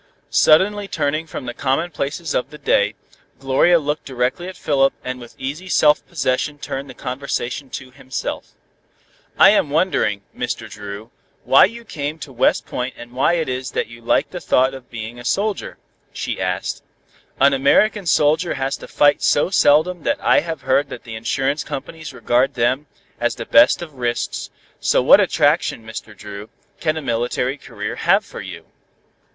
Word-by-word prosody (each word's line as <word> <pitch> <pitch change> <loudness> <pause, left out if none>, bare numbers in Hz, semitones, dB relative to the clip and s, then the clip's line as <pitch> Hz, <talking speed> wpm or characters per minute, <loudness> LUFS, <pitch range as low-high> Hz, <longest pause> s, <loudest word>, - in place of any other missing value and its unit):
Suddenly 200 +6 +4
turning 155 -1 -1
from 140 - -7
the 120 - -4
commonplaces 145 +3 -2
of 125 - -1
the 150 - -11
day, - - +2 0.4
Gloria 135 +6 +3
looked 150 -1 -2
directly 130 +7 -2
at 185 - -8
Philip, 135 -2 +2
and 130 0 -4
with 120 -1 -12
easy 150 +8 -5
self 150 -3 +4
possession 145 -2 -1
turned 140 -1 -5
the 130 - -10
conversation 130 +1 -4
to 130 0 -8
himself. 130 0 -6 0.8
"I 195 - +8
am 205 -8 +2
wondering, 145 - +1
Mr. - - -3
Dru, 105 +2 -9 0.3
why 135 - +7
you 230 +4 -7
came 150 -2 -4
to 145 -4 -9
West 125 - +2
Point 125 +1 -4
and 120 0 -11
why 130 +7 +2
it 165 -2 0
is 130 0 -4
you 115 +1 -3
like 115 - +1
the 180 - -5
thought 130 -4 +2
of 130 -2 -11
being 115 +1 -7
a - - -9
soldier?" 200 - -1 0.3
she - - -4
asked. - - -2 0.6
"An 140 +1 +5
American 175 +9 +3
soldier 155 +4 +2
has 135 0 -1
to - - -11
fight 145 0 +3
so 145 - +2
seldom 175 -1 +4
that - - 0
I - - +4
have 165 -2 -5
heard 140 +2 +1
that - - -8
the 115 - -9
insurance 135 +6 -1
companies 150 +2 -7
regard 125 +1 +1
them 130 +4 0 0.3
as - - 0
the - - -6
best - - +5
of 160 -3 -10
risks, 120 -2 -3 0.3
so - - +2
what - - +8
attraction, 115 - +1
Mr. 110 -1 -8
Dru, 105 +1 -9 0.3
can 155 0 0
a 155 - -4
military 125 +3 -1
career 105 -5 -6
have - - +3
for - - -9
you?" - - -9
135 Hz, 170 wpm, -20 LUFS, 125-155 Hz, 0.8 s, I